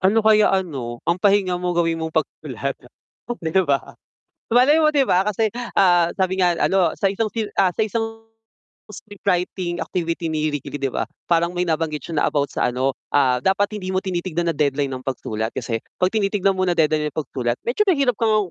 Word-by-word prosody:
Ano 195 +4 +3
kaya 215 -1 +5
ano, 135 -11 -2
ang 170 +2 0
pahinga 195 -3 +2
mo 180 -1 -2
gawin 165 -1 +1
mong 160 - -2
pagsusulat, 140 -4 -2 0.6
oh 240 - -3
'di 165 +1 +1
ba. 140 -1 0 0.6
Malay 265 +7 +5
mo 305 - +5
'di 280 -3 +2
ba 180 - +3
kasi, 220 +2 +1 0.3
ah, 175 -3 +4
sabi 190 0 +1
nga 175 -1 +2
ano, 185 -4 +3
sa 200 - +1
isang, 210 +3 0 0.2
ah, 190 -2 +3
sa 180 - -1
isang 225 0 -4 0.6
scriptwriting 180 -3 -3
activity 170 -1 -3
ni 155 0 0
Ricky 145 -1 -6
Lee 145 - -5
'di 135 - 0
ba, - - -2 0.2
parang 170 +1 +2
may 175 - 0
nabanggit 155 -2 -1
siya 165 -3 -2
na - - +3
about 145 -1 0
sa - - 0
ano, 130 +2 -1 0.2
ah, 130 -3 +4
dapat 200 - 0
hindi 185 -1 -4
mo 185 - +1
tinitignan 175 -2 -2
na 160 - -5
deadline 140 -1 0
ang 130 +1 -9
pagsulat 110 -3 -3
kasi 115 -2 -2 0.2
'pag 185 - +4
tinitignan 195 -2 +1
mo 185 - +1
na 175 - +2
deadline 155 -2 +1
ang - - -6
pagsulat, 125 -5 -2
medyo 270 - 0
mahirap 275 - +2
kang 215 -4 +2
175 Hz, 200 wpm, -21 LUFS, 150-200 Hz, 0.6 s, kaya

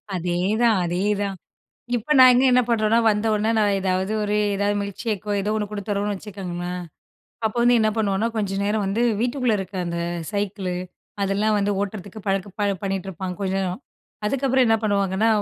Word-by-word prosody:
அதேதான், 190 +6 +1
அதேதான். 195 +3 -1 0.6
இப்ப 245 +7 -1
நாங்க 255 0 +8
என்ன 250 0 +5
பண்ணுறோம்ன்னா, 225 -1 +3
வந்த 210 +1 0
உடனே 215 +1 +1
நான் 205 -2 +3
ஏதாவது 190 +1 0
ஒரு 210 0 -1 0.2
எதாவது 205 +1 +1
மில்க்ஷேக் 200 +1 -4
ஒ 205 - +1
ஏதோ 210 +2 -1
ஒன்னு 210 -1 -1
கொடுத்துறோம்னு 205 0 -2
வச்சுக்கோங்களேன், 180 -3 -5 0.6
அப்போ 220 - -4
வந்து 240 0 +5
என்ன 215 0 +3
பண்ணுவோம்னா 210 0 +1
கொஞ்ச 200 -3 -1
நேரம் 210 0 0
வந்து 215 +5 0 0.2
வீட்டுக்குள்ள 245 -1 +1
இருக்க 190 0 -6
அந்த 170 0 -3 0.3
சைக்கிள், 200 -2 -2 0.5
அதெல்லாம் 200 +2 +1
வந்து 205 0 +1
ஓட்டுறதுக்கு 200 +1 -5
பழக்க 195 0 0 0.3
பண்ணிகிட்டுருப்பாங்க 190 -2 -4
கொஞ்ச 190 -1 -1
நேரம். 185 +4 -3 0.5
அதுக்கப்புறம் 265 +2 +2
என்ன 225 - +4
பண்ணுவாங்கன்னா, 200 0 +1
205 Hz, 150 wpm, -23 LUFS, 190-220 Hz, 0.6 s, நாங்க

